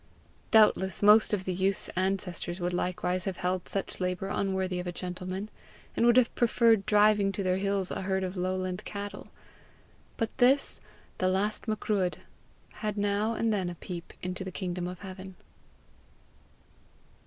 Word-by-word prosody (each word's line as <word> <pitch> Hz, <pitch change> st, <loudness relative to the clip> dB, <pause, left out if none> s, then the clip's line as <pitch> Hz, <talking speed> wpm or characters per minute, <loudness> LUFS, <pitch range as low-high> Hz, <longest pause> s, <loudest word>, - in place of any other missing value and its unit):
Doubtless 210 Hz, -4 st, +4 dB
most 210 Hz, +1 st, +7 dB
of 195 Hz, -3 st, -1 dB
the 185 Hz, -, -1 dB
youth's 190 Hz, +2 st, +1 dB
ancestors 185 Hz, -1 st, -2 dB
would 175 Hz, 0 st, -1 dB
likewise 180 Hz, 0 st, -1 dB
have 190 Hz, -2 st, -3 dB
held 180 Hz, 0 st, -2 dB
such 195 Hz, -, -1 dB
labour 180 Hz, +1 st, -2 dB
unworthy 190 Hz, -2 st, -1 dB
of 180 Hz, -, -5 dB
a -, -, -2 dB
gentleman, 185 Hz, +3 st, -5 dB, 0.4 s
and 235 Hz, -, +3 dB
would 240 Hz, +1 st, +5 dB
have 250 Hz, -3 st, +4 dB
preferred 230 Hz, -3 st, +3 dB
driving 210 Hz, -1 st, +4 dB
to 195 Hz, -, -3 dB
their 185 Hz, 0 st, +1 dB
hills 195 Hz, -1 st, 0 dB
a -, -, -3 dB
herd 190 Hz, 0 st, -1 dB
of 185 Hz, +1 st, -4 dB
lowland 185 Hz, +1 st, -2 dB
cattle; 205 Hz, 0 st, -7 dB, 0.9 s
but 225 Hz, -2 st, -2 dB
this, 265 Hz, +3 st, +3 dB, 0.4 s
the 185 Hz, -, +2 dB
last 200 Hz, +5 st, 0 dB
Macruadh, 210 Hz, -4 st, 0 dB, 0.7 s
had 210 Hz, -1 st, -2 dB
now 205 Hz, +2 st, 0 dB
and 225 Hz, -1 st, +1 dB
then 190 Hz, -4 st, -1 dB
a 175 Hz, -, -6 dB
peep 175 Hz, 0 st, -8 dB
into 180 Hz, +1 st, -3 dB
the 190 Hz, -, -6 dB
kingdom 180 Hz, -1 st, -3 dB
of 180 Hz, 0 st, -7 dB
heaven. 190 Hz, -1 st, -9 dB
190 Hz, 155 wpm, -29 LUFS, 180-210 Hz, 0.9 s, most